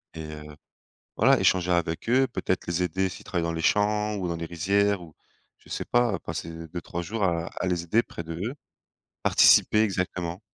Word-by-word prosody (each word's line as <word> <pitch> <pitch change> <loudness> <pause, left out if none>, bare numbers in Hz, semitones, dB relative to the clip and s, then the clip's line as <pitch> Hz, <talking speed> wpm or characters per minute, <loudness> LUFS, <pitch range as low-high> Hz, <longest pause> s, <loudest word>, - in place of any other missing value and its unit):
Et 80 - -6
heu, 75 0 -10 0.6
voilà - - +5
échanger 90 -1 +3
avec 85 0 -1
eux, 130 +2 +4
peut-être 95 -8 -2
les 85 +1 -1
aider, 95 +2 0
s'ils - - -11
travaillent 85 -3 -1
dans 85 - -1
les 80 - -3
champs 105 +2 +2
ou 95 -3 -3
dans 85 - -2
les 85 - -4
rizières, 100 +3 +1
ou 80 -3 -12 0.4
je - - -23
sais - - -3
pas. 120 -4 +2
Passer - - -5 0.2
2-3 85 0 -5
jours 105 +4 -3
à 85 -2 0
à 95 - -4
les 90 -2 0
aider 110 +7 +2
près 85 - -8
d'eux. 85 - -4 0.7
Participer 105 - +5
exactement. 90 -3 -2
90 Hz, 190 wpm, -26 LUFS, 85-100 Hz, 0.7 s, voilà